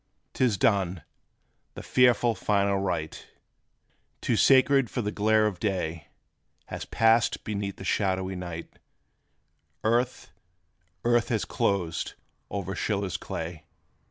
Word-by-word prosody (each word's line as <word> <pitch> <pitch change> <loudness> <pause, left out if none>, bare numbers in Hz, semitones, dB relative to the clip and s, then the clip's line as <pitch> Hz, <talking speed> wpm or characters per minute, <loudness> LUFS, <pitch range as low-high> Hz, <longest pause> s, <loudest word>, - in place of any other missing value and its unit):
'T - - 0
is 110 -5 +1
done, 95 -4 +1 0.7
the - - -8
fearful, 120 -2 +3
final 100 -2 +1
rite, 80 -5 -3 0.9
Too - - 0
sacred 135 -1 +5
for 125 - -3
the 105 - -2
glare 110 +1 +3
of 100 -5 -2
day, 85 -7 -2 0.6
Has - - -6
passed 115 +1 +2
beneath 100 -2 -3
the - - -10
shadowy 95 -1 0
night 85 -2 -7 1.0
Earth, 120 -3 0 0.7
earth 120 -1 +3
has 110 -3 0
closed 90 -5 -1 0.3
o'er 95 -1 -4
SCHILLER's 100 -1 -2
clay! 80 -1 -6
100 Hz, 115 wpm, -27 LUFS, 90-115 Hz, 1.0 s, sacred